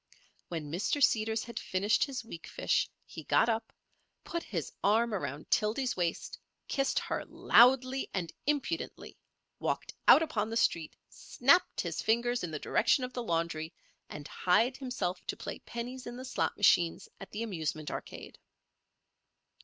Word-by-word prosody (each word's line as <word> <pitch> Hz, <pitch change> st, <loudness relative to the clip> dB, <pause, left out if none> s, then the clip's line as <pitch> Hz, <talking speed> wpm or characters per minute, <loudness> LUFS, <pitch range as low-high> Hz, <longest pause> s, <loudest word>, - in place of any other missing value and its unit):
When 155 Hz, -4 st, -5 dB
Mr. 190 Hz, -, 0 dB
Seeders 220 Hz, -4 st, +2 dB
had 235 Hz, -, -6 dB
finished 200 Hz, +3 st, +1 dB
his 270 Hz, -4 st, -5 dB
weakfish 225 Hz, -, -1 dB, 0.2 s
he -, -, -9 dB
got -, -, +3 dB
up, 225 Hz, 0 st, -1 dB, 0.5 s
put 340 Hz, -, -3 dB
his 170 Hz, -, -4 dB
arm 225 Hz, +3 st, +3 dB
around 150 Hz, -6 st, -4 dB
Tildy's 230 Hz, +4 st, +1 dB
waist, 175 Hz, -2 st, -2 dB, 0.3 s
kissed 275 Hz, -1 st, 0 dB
her -, -, -1 dB
loudly 255 Hz, +2 st, +4 dB
and 175 Hz, -4 st, -3 dB
impudently, 295 Hz, +3 st, -2 dB, 0.4 s
walked -, -, -2 dB
out 320 Hz, -, +9 dB
upon 215 Hz, -8 st, -1 dB
the 225 Hz, -, -2 dB
street, 165 Hz, -8 st, +1 dB
snapped 280 Hz, +9 st, +2 dB
his -, -, -3 dB
fingers 235 Hz, +1 st, +1 dB
in 175 Hz, -, -2 dB
the 155 Hz, -, -4 dB
direction 245 Hz, -, +2 dB
of 250 Hz, 0 st, -4 dB
the 245 Hz, -, -3 dB
laundry, 165 Hz, -4 st, -2 dB, 0.3 s
and 150 Hz, 0 st, -8 dB
hied 230 Hz, +8 st, +2 dB
himself 205 Hz, -10 st, -3 dB
to -, -, -3 dB
play -, -, -6 dB
pennies 245 Hz, +2 st, -6 dB
in 240 Hz, 0 st, -6 dB
the 255 Hz, -, -7 dB
slot 255 Hz, -, -1 dB
machines 175 Hz, -4 st, +3 dB
at 195 Hz, -, -9 dB
the 215 Hz, +2 st, -4 dB
Amusement 160 Hz, -7 st, -3 dB
Arcade. -, -, -8 dB
225 Hz, 150 wpm, -31 LUFS, 175-255 Hz, 0.5 s, out